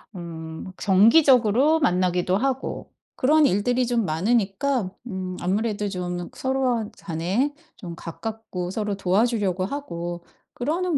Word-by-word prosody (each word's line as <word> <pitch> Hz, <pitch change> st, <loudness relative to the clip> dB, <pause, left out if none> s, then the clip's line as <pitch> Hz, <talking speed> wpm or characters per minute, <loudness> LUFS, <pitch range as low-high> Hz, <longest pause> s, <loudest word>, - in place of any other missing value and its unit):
음 165 Hz, 0 st, -7 dB
정기적으로 245 Hz, +6 st, +5 dB
만나기도 180 Hz, -, +1 dB
하고 265 Hz, +4 st, -2 dB, 0.2 s
그런 300 Hz, +3 st, +4 dB
일들이 245 Hz, +3 st, +2 dB
좀 235 Hz, -2 st, 0 dB
많으니까 200 Hz, -, 0 dB, 0.2 s
음 185 Hz, -5 st, -5 dB
아무래도 205 Hz, +3 st, -1 dB
좀 180 Hz, -2 st, -4 dB
서로 255 Hz, -5 st, 0 dB
간에 190 Hz, -, -1 dB, 0.2 s
좀 175 Hz, -5 st, -8 dB
가깝고 180 Hz, +1 st, -6 dB
서로 210 Hz, 0 st, -2 dB
도와주려고 195 Hz, -1 st, +1 dB
하고 175 Hz, -9 st, -5 dB, 0.3 s
그러는 325 Hz, +5 st, 0 dB
205 Hz, 265 characters per minute, -24 LUFS, 180-250 Hz, 0.3 s, 정기적으로